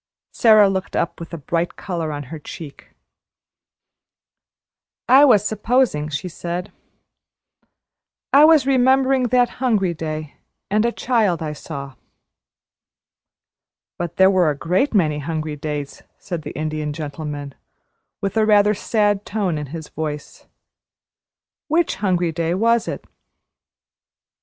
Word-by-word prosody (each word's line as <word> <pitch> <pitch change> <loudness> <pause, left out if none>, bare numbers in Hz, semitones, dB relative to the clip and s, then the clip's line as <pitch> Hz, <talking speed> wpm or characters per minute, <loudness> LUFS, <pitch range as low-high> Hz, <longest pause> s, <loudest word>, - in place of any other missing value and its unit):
Sara 215 -3 +6
looked 190 -1 -3
up - - -1
with 170 - -9
a 170 - -5
bright 165 +4 -2
color 170 -5 -4
on 145 -1 -5
her 160 - -6
cheeks. 150 0 -10 2.2
"I 270 +3 +7
was 215 -7 +5
`supposing,'" 215 - 0
she 150 +5 -3
said; 175 +3 -5 1.6
"I 285 +2 +8
was 315 -4 +5
remembering 265 0 +3
that 245 0 +3
hungry 210 -8 +1
day, 155 -2 -6 0.3
and 210 +2 +2
a 235 - +1
child 220 -10 0
I 150 -1 -3
saw." 140 -2 -8 2.1
"But 175 -1 -4
there 190 0 +5
were 180 -4 +3
a 145 - -2
great 185 - 0
many 155 -6 +2
hungry 155 0 -4
days," 145 -1 -5 0.2
said 175 -4 -5
the - - -8
Indian 155 -1 -3
Gentleman, 145 -2 -6 0.7
with 195 +1 -2
a 220 - +4
rather 210 0 +5
sad 205 -1 0
tone 200 -6 -2
in 150 - -6
his 160 +2 -8
voice. 150 -2 -6 1.2
"Which 330 +2 +1
hungry 180 -4 0
day 165 +1 -1
was 230 +3 +2
it?" - - -5
175 Hz, 125 wpm, -21 LUFS, 155-220 Hz, 2.2 s, I